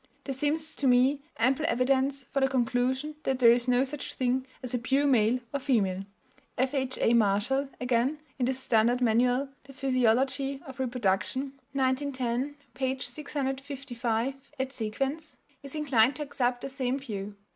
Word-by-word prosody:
There 275 - -3
seems 305 +4 0
to 275 - +1
me 260 +3 +4 0.2
ample 265 +7 +2
evidence 270 +1 +1
for 275 - +1
the 270 - +4
conclusion 260 +3 0
that 265 -4 0
there 235 -2 +7
is 240 +1 +2
no 250 +1 +4
such 280 +1 -5
thing 255 +1 0 0.2
as 255 0 -5
a 245 - +1
pure 270 +4 +1
male 245 -2 +3
or 280 - 0
female." 200 -9 +1 0.5
F.H.A. 260 -2 +1
Marshall, 235 +6 +2
again, 250 +4 +1 0.2
in 245 - +2
his 260 0 0
standard 240 -1 +2
manual, 250 +3 +2 0.2
The 275 - -13
Physiology 265 +1 +1
of 265 -1 -10
Reproduction 250 +2 -1 0.2
(1910, 260 0 0 0.2
p. 260 0 -1
655 270 -2 -3
et 265 0 -2
seq.), 220 -4 -4 0.6
is 275 +1 -6
inclined 270 -4 +3
to 300 - -3
accept 250 -3 -1
the 275 - -4
same 265 -1 -1
view. 205 -7 -6
260 Hz, 150 wpm, -28 LUFS, 245-275 Hz, 0.6 s, there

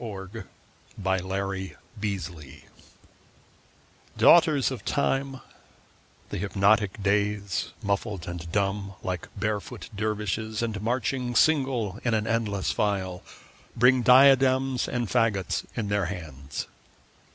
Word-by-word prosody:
Ralph 95 -4 -6 0.7
Waldo 95 -1 -1
Emerson 95 -1 -4 0.2
Days 85 -9 -5 1.5
DAUGHTERS 155 -6 +5
of 120 -7 -6
Time, 135 +4 -1 0.9
the - - -4
hypocritic 100 +1 +2
Days, 100 -1 0
Muffled 100 -2 -2
and 85 -1 -6
dumb 100 0 -1
like 90 -2 -3
barefoot 105 -1 -3
dervishes, 105 +1 -2
And 110 -3 -3
marching 125 +2 -1
single 125 -7 +2
in 115 -2 +1
an 110 -1 0
endless 110 -4 0
file, 95 -4 -1 0.5
Bring 125 +2 +5
diadems 130 0 +5
and 120 -2 -2
faggots 110 -5 0
in 105 -3 -2
their 100 -2 +1
hands. 75 -7 -6
105 Hz, 105 wpm, -26 LUFS, 95-120 Hz, 1.5 s, DAUGHTERS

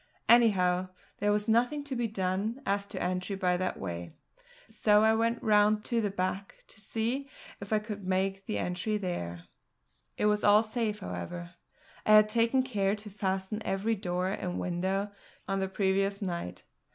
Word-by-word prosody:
Anyhow, 185 -6 +4 0.3
there 205 +1 +2
was 210 0 0
nothing 245 +6 +2
to 280 -2 -5
be 240 -1 0
done 200 +3 -2
as 200 0 0
to - - -6
entry 180 +2 -2
by 180 -2 +1
that 185 0 -2
way, 85 -2 -6 0.5
so 210 0 +3
I 220 0 +5
went 230 +1 0
round 210 0 +4
to 235 -1 0
the 205 - 0
back 190 +1 -3
to 220 - -15
see 240 +6 -2 0.3
if 200 +1 -9
I 215 - +4
could 210 -1 -5
make 190 +2 -1
an 215 - -1
entry 180 +4 -1
there. 85 - -4 0.7
It - - 0
was 210 0 +2
all 210 +1 +6
safe, 215 -2 -2
however; 175 -2 -6 0.5
I 215 - +4
had 215 0 +7
taken 235 +3 +2
care 205 -6 0
to 210 0 -11
fasten 195 +1 -2
every 200 +4 0
door 180 -2 -1
and 180 -2 -3
window 190 +3 -1 0.4
on 195 0 0
the 190 - 0
previous 195 +1 0
night. 170 - -4
200 Hz, 170 wpm, -30 LUFS, 185-220 Hz, 0.7 s, had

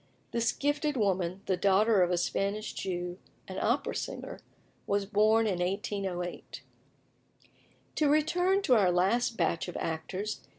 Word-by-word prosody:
This 235 0 +1
gifted 290 0 -1
woman, 190 -3 0
the 190 - +1
daughter 200 +3 +3
of 175 - +3
a 180 - +1
Spanish 200 +4 -1
Jew 180 -1 -4 0.3
(an - - -5
opera - - 0
singer), - - -5 0.5
was 200 0 +1
born 215 +2 +3
in 190 -5 0
1808. 185 -1 -3 1.3
To 300 -2 +3
return 355 +6 +2
to 260 - +4
our 200 -6 +4
last 225 +7 +1
batch 170 - 0
of 180 - -5
actors. 185 +6 -4
200 Hz, 135 wpm, -30 LUFS, 180-230 Hz, 1.3 s, to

